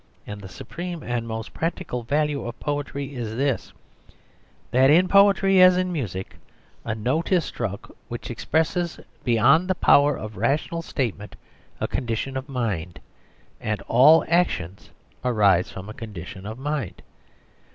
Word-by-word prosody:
And 105 0 -7
the 95 - -9
supreme 170 - -7
and 120 -1 -3
most 110 -1 -5
practical 165 -6 -3
value 145 +4 0
of 120 - -7
poetry 145 -1 -3
is 115 -4 -5
this, 135 0 -1 1.0
that 130 +3 +5
in 175 +5 +5
poetry, 195 -1 +5
as 185 0 +7
in 185 0 0
music, 100 - -4 0.5
a 110 - -3
note 130 - -1
is 180 -4 +3
struck 100 -4 -5
which - - -6
expresses 165 +2 -1 0.2
beyond 135 +9 +4
the 185 - +1
power 145 -4 +4
of 110 -1 -8
rational 155 +4 0
statement 115 - -4 0.4
a - - -1
condition 120 +3 -3
of 130 +2 -5
mind, 100 -10 -3 0.6
and 110 -1 -2
all 145 +7 +6
actions 100 - 0 0.3
arise 105 -7 +3
from 95 +1 -8
a 110 - -7
condition 100 -3 -8
of 110 +2 -6
mind. 140 - -4
130 Hz, 140 wpm, -24 LUFS, 110-160 Hz, 1.0 s, as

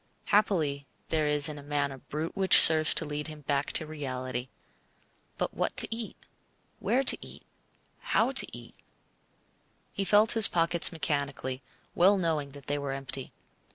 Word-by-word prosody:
Happily 155 -10 0 0.2
there 155 -2 0
is 150 +1 +1
in 145 -2 -7
man 145 -1 -1
a 135 - -10
brute 155 +5 -6
which 190 -2 +6
serves 155 -1 +7
to 160 - 0
lead 150 0 -5
him 155 -1 -10
back 140 0 -2
to 160 - -1
reality. 130 -4 -6 0.9
But - - -3
what - - -3
to - - +3
eat, 230 -2 -6 0.6
where 260 +3 0
to - - +6
eat, - - -10 0.5
how - - 0
to - - +5
eat? - - -10 1.2
He 200 - -3
felt 210 +3 +3
his 225 -3 +6
pockets 170 0 +1
mechanically, 140 -5 -3 0.3
well 195 +4 +4
knowing 155 -6 -2
that 140 -2 -13
they 145 0 -2
were 140 -1 -4
empty. 135 -1 -6
150 Hz, 155 wpm, -28 LUFS, 140-170 Hz, 1.2 s, serves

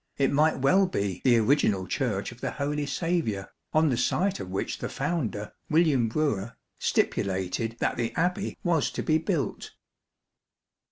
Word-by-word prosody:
it 135 -1 +2
might 155 +3 +3
well 185 +9 +4
be 100 - -2
the 125 -3 +5
original 110 -5 +2
Church 105 -2 -1
of 120 - -14
the - - -1
Holy 145 0 -2
Saviour, 140 - -1 0.2
on 155 0 +3
the 125 - +1
site 185 +10 +1
of 95 -2 -6
which 95 +1 -3
the - - -3
founder, 115 -11 -2 0.2
William 155 -7 +3
Brewer, 115 -6 -1 0.3
stipulated 95 +4 0
that - - -1
the 115 -1 -1
Abbey 180 +4 -1
was 170 -6 +2
to - - -4
be 155 0 +3
built. 160 - -2
135 Hz, 155 wpm, -27 LUFS, 105-160 Hz, 0.3 s, the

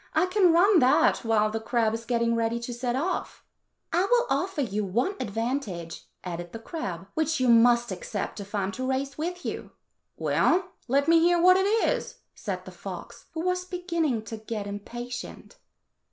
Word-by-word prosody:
I - - +4
can 365 -1 +4
run 365 +3 +5
that 255 0 +4
while 215 -2 +2
the 225 - -2
crab 225 0 +1
is 230 0 -4
getting 235 -1 +1
ready 230 0 0
to 240 +1 -5
set 240 0 -2
off." 350 +7 -3 0.5
"I 350 +2 +3
will 485 +4 +3
offer 370 -4 0
you 215 -4 -1
one 235 - 0
advantage," 220 -7 -3 0.2
added 175 -1 -6
the - - -4
crab, 210 - -5
"which 315 -1 0
you 255 - +2
must 235 0 +5
accept 195 +3 -4
if 200 +1 -7
I 200 - +1
am 190 - -2
to 255 +4 -3
race 270 +1 -1
with 355 +3 -4
you." - - -5 0.4
"Well, 370 +1 +2 0.2
let 280 +4 +2
me 330 0 +6
hear 345 +1 +4
what 365 +2 +7
it 380 +1 +2 0.2
is," - - -2 0.2
said - - -5
the - - -9
fox, - - -9
who 320 - -2
was 365 +1 0
beginning 340 - -1
to 225 0 -7
get 215 -1 -5
impatient. 240 +4 -7
245 Hz, 180 wpm, -27 LUFS, 220-340 Hz, 0.5 s, what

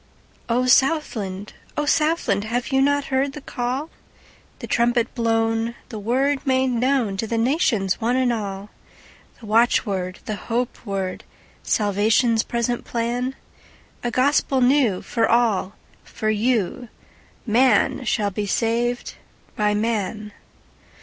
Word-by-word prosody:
O 245 +2 +2
SOUTHLAND! 250 -8 +1 0.2
O 295 - 0
Southland! 300 - +1
Have 240 +3 -2
you 265 0 +3
not 285 0 +1
heard 270 +1 +1
the 295 - -7
call, 260 +3 -3 0.7
The - - -7
trumpet 240 0 +1
blown, 225 0 0
the 220 -4 -6
word 265 +6 +1
made 260 -1 +2
knownTo 235 -4 0
the 230 - -1
nations, 230 - +1
one 235 +3 +1
and 255 -2 +2
all? 200 -2 -5 0.7
The 230 - -12
watchword, 205 -4 +1
the 215 - -3
hope 240 +4 -3
word, 195 -2 -3 0.4
Salvation's 220 +3 +2
present 235 +1 -2
plan?A 245 +1 -5
gospel 265 +2 +2
new, 250 -6 +3
for 230 -2 0
all—for 215 -1 -1
you:Man 235 +1 0
shall 215 -3 0
be 205 +2 -3
saved 235 +3 -1 0.4
by 210 0 +1
man. 215 -1 -2
235 Hz, 115 wpm, -22 LUFS, 215-255 Hz, 0.7 s, you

